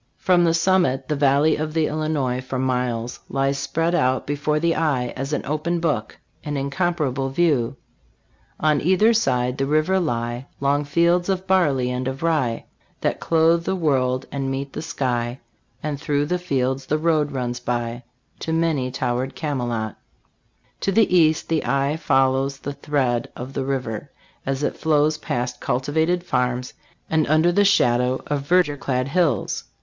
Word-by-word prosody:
From 180 Hz, -2 st, +3 dB
the 165 Hz, -, +3 dB
summit, 165 Hz, -7 st, +2 dB
the 150 Hz, -, +1 dB
valley 140 Hz, +2 st, +3 dB
of 155 Hz, +1 st, -4 dB
the 160 Hz, -1 st, +3 dB
Illinois 150 Hz, -5 st, -1 dB
for 130 Hz, 0 st, -5 dB
miles 125 Hz, -2 st, -1 dB
lies 135 Hz, 0 st, 0 dB
spread 165 Hz, +4 st, -1 dB
out 130 Hz, -6 st, +1 dB
be 145 Hz, -, -2 dB
fore 150 Hz, +1 st, 0 dB
the 165 Hz, +1 st, +2 dB
eye 140 Hz, -7 st, 0 dB
as 135 Hz, +2 st, -4 dB
an 150 Hz, -, -2 dB
open 155 Hz, +4 st, -1 dB
book 145 Hz, -10 st, -1 dB, 0.3 s
an 145 Hz, -1 st, -3 dB
incomparable 140 Hz, -2 st, -1 dB
view. 140 Hz, -4 st, +1 dB, 0.4 s
" -, -, -38 dB
On 150 Hz, -2 st, +2 dB
either 190 Hz, +7 st, +4 dB
side 125 Hz, -, +1 dB
the 135 Hz, -, +1 dB
river 155 Hz, +6 st, +2 dB
lie 120 Hz, -4 st, -2 dB
Long 140 Hz, +1 st, +1 dB
fields 170 Hz, +5 st, +2 dB
of 190 Hz, -1 st, -1 dB
barley 145 Hz, -10 st, +2 dB
and 125 Hz, +1 st, -2 dB
of 135 Hz, +3 st, -4 dB
rye, 145 Hz, -9 st, 0 dB, 0.4 s
That -, -, 0 dB
clothe 165 Hz, +1 st, +3 dB
the 190 Hz, -, 0 dB
world 130 Hz, -6 st, +1 dB
and 135 Hz, -1 st, -2 dB
meet 135 Hz, +1 st, -4 dB
the -, -, -4 dB
sky; 125 Hz, -6 st, -2 dB, 0.4 s
And 150 Hz, -2 st, -3 dB
through 145 Hz, -2 st, 0 dB
the 180 Hz, +4 st, -1 dB
fields 135 Hz, -5 st, -1 dB
the 155 Hz, -, +1 dB
road 155 Hz, -2 st, +1 dB
runs 125 Hz, -2 st, -3 dB
by 120 Hz, 0 st, -3 dB, 0.4 s
To 160 Hz, -, -4 dB
many 160 Hz, -6 st, +1 dB
towered 125 Hz, +1 st, -2 dB
Camelot 120 Hz, -8 st, -3 dB, 0.8 s
To 195 Hz, -, 0 dB
the 200 Hz, -2 st, +3 dB
east 160 Hz, -2 st, +3 dB
the 160 Hz, -1 st, 0 dB
eye 140 Hz, +3 st, +1 dB
follows 135 Hz, -2 st, +1 dB
the 145 Hz, +1 st, -5 dB
thread 130 Hz, -5 st, -1 dB
of 130 Hz, +2 st, -7 dB
the 135 Hz, -, -2 dB
river, 130 Hz, -2 st, -3 dB, 0.4 s
as 135 Hz, +1 st, -1 dB
it -, -, -1 dB
flows 155 Hz, -1 st, +2 dB
past 125 Hz, -3 st, -3 dB
cultivated 160 Hz, +7 st, 0 dB
farms 125 Hz, -4 st, -1 dB, 0.3 s
and 160 Hz, -1 st, +1 dB
under 155 Hz, +4 st, +4 dB
the 205 Hz, +4 st, +3 dB
shadow 125 Hz, -9 st, +2 dB
of 145 Hz, -1 st, -1 dB
verdure 170 Hz, -4 st, +3 dB
clad 130 Hz, 0 st, -1 dB
hills. 150 Hz, -, 0 dB
140 Hz, 165 wpm, -22 LUFS, 130-160 Hz, 0.8 s, either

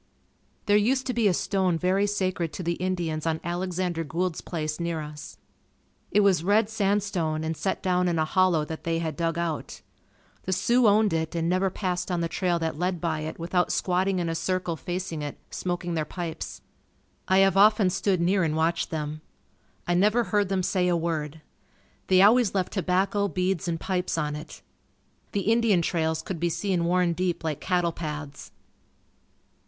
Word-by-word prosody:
There 205 Hz, 0 st, +4 dB
used 255 Hz, +5 st, +2 dB
to 250 Hz, -, -1 dB
be 230 Hz, -2 st, +2 dB
a 190 Hz, -, +3 dB
stone 190 Hz, -3 st, +1 dB
very 190 Hz, +4 st, +1 dB
sacred 185 Hz, -5 st, -1 dB
to 180 Hz, -, -5 dB
the 170 Hz, -, 0 dB
Indians 170 Hz, -3 st, -2 dB
on 160 Hz, -1 st, 0 dB
Alexander 175 Hz, -1 st, -2 dB
Gould's 165 Hz, +3 st, -2 dB
place 155 Hz, -2 st, -4 dB
near 170 Hz, -1 st, -2 dB
us. 150 Hz, 0 st, -8 dB, 0.7 s
It 210 Hz, -, +3 dB
was 190 Hz, -5 st, +3 dB
red 205 Hz, +3 st, +3 dB
sandstone 195 Hz, -7 st, 0 dB
and 160 Hz, +1 st, -2 dB
set 190 Hz, -, -2 dB
down 180 Hz, -1 st, +2 dB
in 170 Hz, -1 st, 0 dB
a 155 Hz, -, +2 dB
hollow 175 Hz, -2 st, +2 dB
that 160 Hz, +1 st, -7 dB
they 165 Hz, 0 st, 0 dB
had 160 Hz, -2 st, -3 dB
dug 165 Hz, 0 st, -1 dB
out. 170 Hz, -3 st, -4 dB, 0.6 s
The 190 Hz, -, 0 dB
Sioux 235 Hz, +7 st, +3 dB
owned 210 Hz, -2 st, +4 dB
it 160 Hz, +1 st, -2 dB
and 165 Hz, 0 st, 0 dB
never 185 Hz, +2 st, +2 dB
passed 180 Hz, -1 st, -3 dB
on 175 Hz, -2 st, 0 dB
the 170 Hz, -, 0 dB
trail 175 Hz, 0 st, 0 dB
that 160 Hz, -2 st, -3 dB
led 180 Hz, 0 st, -1 dB
by 160 Hz, -2 st, -1 dB
it 155 Hz, +1 st, -5 dB
without 175 Hz, +2 st, 0 dB
squatting 185 Hz, +1 st, +1 dB
in 175 Hz, -1 st, -1 dB
a 165 Hz, -, -1 dB
circle 180 Hz, 0 st, -1 dB
facing 175 Hz, -1 st, -4 dB
it, 145 Hz, -1 st, -5 dB
smoking 175 Hz, -1 st, -3 dB
their 160 Hz, -2 st, 0 dB
pipes. 165 Hz, 0 st, -6 dB, 0.7 s
I 190 Hz, -, +4 dB
have 195 Hz, -, +2 dB
often 205 Hz, -1 st, +5 dB
stood 190 Hz, 0 st, +1 dB
near 185 Hz, +3 st, +2 dB
and 155 Hz, -3 st, 0 dB
watched 165 Hz, +1 st, 0 dB
them. 155 Hz, -1 st, -4 dB, 0.7 s
I 175 Hz, -, +2 dB
never 210 Hz, +7 st, +3 dB
heard 205 Hz, -1 st, 0 dB
them 190 Hz, -1 st, 0 dB
say 180 Hz, 0 st, +1 dB
a 175 Hz, -1 st, +2 dB
word. 160 Hz, -2 st, -3 dB, 0.7 s
They 185 Hz, 0 st, +5 dB
always 225 Hz, 0 st, +5 dB
left 185 Hz, -2 st, -1 dB
tobacco, 195 Hz, +2 st, +1 dB
beads 185 Hz, 0 st, -1 dB
and 165 Hz, -1 st, -1 dB
pipes 180 Hz, -2 st, -2 dB
on 150 Hz, -2 st, -1 dB
it. 150 Hz, -, -10 dB, 0.7 s
The 200 Hz, -, 0 dB
Indian 220 Hz, -4 st, +3 dB
trails 160 Hz, -1 st, 0 dB
could 180 Hz, -4 st, -5 dB
be 170 Hz, +1 st, +1 dB
seen 180 Hz, -1 st, -1 dB
worn 180 Hz, 0 st, +2 dB
deep 180 Hz, 0 st, -2 dB
like 155 Hz, -3 st, -3 dB
cattle 175 Hz, -2 st, +1 dB
paths. 150 Hz, -3 st, -7 dB
180 Hz, 185 wpm, -26 LUFS, 165-190 Hz, 0.7 s, often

